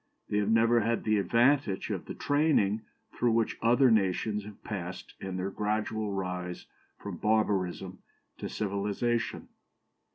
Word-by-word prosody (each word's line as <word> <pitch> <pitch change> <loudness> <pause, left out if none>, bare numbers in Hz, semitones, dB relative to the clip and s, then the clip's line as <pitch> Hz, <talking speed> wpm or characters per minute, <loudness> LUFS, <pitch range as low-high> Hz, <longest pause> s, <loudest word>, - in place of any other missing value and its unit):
They 105 - +1
have 105 0 0
never 115 +1 +4
had 115 +1 0
the 110 -1 +2
advantage 120 -1 +2
of - - -3
the - - -7
training 145 -9 +2 0.3
through 120 -2 +1
which 115 -1 0
other 120 +2 +5
nations 105 0 +1
have 105 -1 -12
passed 95 -3 -6
in 95 -1 -4
their 95 +2 -2
gradual 105 +1 -1
rise 90 -2 -4 0.3
from - - -7
barbarism 95 -4 0 0.4
to - - -4
civilization. 105 +3 -1
105 Hz, 135 wpm, -30 LUFS, 95-115 Hz, 0.4 s, other